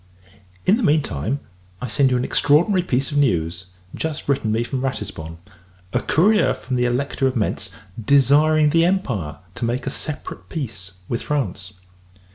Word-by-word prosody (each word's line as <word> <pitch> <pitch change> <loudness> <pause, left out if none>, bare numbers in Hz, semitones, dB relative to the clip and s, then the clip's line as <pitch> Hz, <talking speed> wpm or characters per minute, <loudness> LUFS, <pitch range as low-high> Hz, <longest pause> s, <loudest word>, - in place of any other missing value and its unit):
In 200 - +5
the - - -2
mean 150 - +3
time, 110 - -3 0.4
I 125 - -4
send 130 +5 +3
you 125 - +2
an 125 - -1
extraordinary 175 +6 +3
piece 135 -5 -1
of 145 - +1
news, 85 - 0 0.3
just 160 -1 -4
written 135 -6 +1
me 115 +2 +1
from 130 +2 -3
Ratisbon 95 -11 -4 0.6
a - - +2
courier 210 +6 +3
from 130 - -4
the 125 0 +2
Elector 135 +2 0
of 130 - -2
Mentz, 110 -4 -2 0.3
desiring 150 +4 +4
the 165 +1 +4
Empire 125 - -1 0.2
to - - -6
make 120 +3 -2
a - - -2
separate 150 -2 -6
peace 110 - -5
with 120 - -2
France. 100 -10 -3
135 Hz, 165 wpm, -21 LUFS, 110-150 Hz, 0.6 s, In